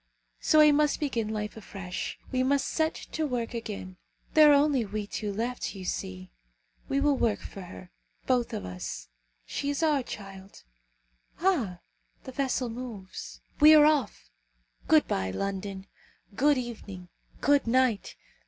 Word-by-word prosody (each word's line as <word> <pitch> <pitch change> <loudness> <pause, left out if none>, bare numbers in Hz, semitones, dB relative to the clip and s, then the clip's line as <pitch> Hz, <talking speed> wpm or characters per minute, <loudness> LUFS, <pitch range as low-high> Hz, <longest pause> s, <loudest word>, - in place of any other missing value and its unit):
So 310 - +3
we 305 -1 +8
must 295 0 +2
begin 235 -7 -1
life 210 -1 -3
afresh. 195 -4 -6
We 255 -1 +1
must 275 +1 +2
set 315 0 0 0.2
to 315 -1 -1
work 245 -3 -3
again. 205 -5 -6 0.4
There 305 -1 +8
are 290 - +7
only 285 -3 +3
we 210 0 -4
two 205 0 -4
left, 230 +2 -3
you 190 -1 -7
see. 95 - -5 0.6
We 275 - +1
will 290 0 +3
work 225 -5 +1
for 195 - -9
her, 180 0 -11 0.3
both 245 -2 +1
of 220 - -4
us! - - -6 0.4
She 285 - -3
is 285 +3 -1
our 300 -4 +3
child, 195 -4 -10 0.8
Ah! 255 - +1 0.4
the 260 - -8
vessel 260 -1 -1
moves! 225 -5 -8 0.2
We 305 +1 +9
are 300 -1 +8
off! 255 - +1 0.6
Good - - +5
bye, 95 0 -1
London! 195 - -4 0.5
Good 290 +3 +4
evening! 205 -7 -7 0.3
good 285 -2 +3
night! 250 -3 +1
235 Hz, 150 wpm, -28 LUFS, 195-280 Hz, 0.8 s, We